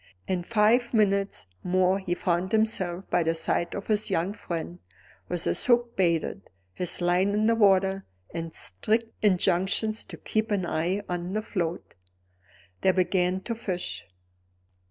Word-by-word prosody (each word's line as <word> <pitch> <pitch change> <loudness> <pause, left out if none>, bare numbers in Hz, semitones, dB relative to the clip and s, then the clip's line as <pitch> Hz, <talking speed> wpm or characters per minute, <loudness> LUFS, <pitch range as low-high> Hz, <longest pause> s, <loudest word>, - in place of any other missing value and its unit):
In 185 -2 0
five 230 +5 +2
minutes 200 -2 +1 0.2
more 185 +1 +2
he 180 -2 -2
found 180 0 -1
himself 195 -5 0
by - - +3
the 165 0 0
side 165 +1 -1
of 200 - -5
his 215 -1 +1
young 175 +5 0
friend 175 -3 -5 0.5
with 175 -1 +2
his - - +1
hook 240 -1 +2
baited, 170 - 0 0.2
his 180 - 0
line 180 +3 +2
in 215 +1 +2
the 230 - +4
water, 195 -3 +3 0.3
and 165 -1 -4
strict 220 - +1
injunctions 195 +2 +1
to - - -10
keep 220 0 -2
an 200 -4 0
eye 175 +5 -1
on 175 +1 -3
the 215 - 0
float. 175 -5 -3 0.9
They 190 - +4
began 185 0 +1
to 230 - -4
fish. 180 - -4
190 Hz, 150 wpm, -27 LUFS, 175-210 Hz, 0.9 s, the